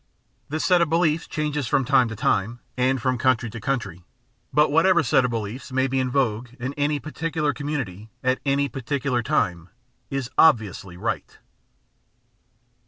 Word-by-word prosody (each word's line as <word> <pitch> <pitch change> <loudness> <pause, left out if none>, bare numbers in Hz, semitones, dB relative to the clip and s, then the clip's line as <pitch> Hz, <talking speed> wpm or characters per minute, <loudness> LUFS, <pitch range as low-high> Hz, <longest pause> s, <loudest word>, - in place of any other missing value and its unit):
This 155 +2 -2
set 180 -2 +4
of 170 - +2
beliefs 165 -1 +1
changes 150 -3 -2
from 135 - +2
time 130 -1 +4
to 110 - -6
time 110 +3 0 0.2
and 130 +1 +1
from 125 +1 0
coimtry 120 -2 +1
to 120 - -8
coimtry, 100 -9 -2 0.5
but 150 0 +3
what 160 +5 +4
ever 190 - +4
set 130 +1 +3
of 125 - +1
beliefs 115 +4 -5
may 130 0 +2
be 135 0 0
in 130 -1 0
vogue 125 -3 0
in 130 +3 -3
any 145 0 0
particular 155 0 -2
community 125 -9 -4
at 130 0 +1
any 140 0 +1
particular 130 0 -2
time 90 -5 -1 0.4
is 135 -3 -3
"obviously" 105 - +3
right. - - -4
130 Hz, 165 wpm, -24 LUFS, 115-145 Hz, 0.5 s, set